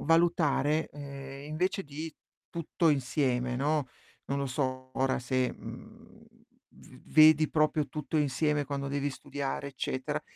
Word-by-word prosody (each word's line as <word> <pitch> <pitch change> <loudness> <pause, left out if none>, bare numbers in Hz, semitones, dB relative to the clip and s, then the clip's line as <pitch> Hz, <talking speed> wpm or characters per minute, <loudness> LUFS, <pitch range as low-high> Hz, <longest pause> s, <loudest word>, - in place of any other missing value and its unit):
valutare, 160 -2 +3
ehm, 140 -1 -8
invece 185 +6 0
di 155 +1 -6 0.4
tutto 170 0 0
insieme, 125 -3 +1
no, 145 +1 +1 0.4
non 140 - -1
lo 140 - -1
so 130 -1 -2
ora 135 0 +2
se, 130 0 0
mhmm, - - -12 0.5
v - - -15
vedi 155 0 +7
proprio 155 -1 +2
tutto 155 +1 -3
insieme 150 0 +2
quando 140 0 -3
devi 140 +1 -1
studiare 140 +1 -4
eccetera, 130 -1 -3
145 Hz, 125 wpm, -30 LUFS, 135-155 Hz, 0.5 s, vedi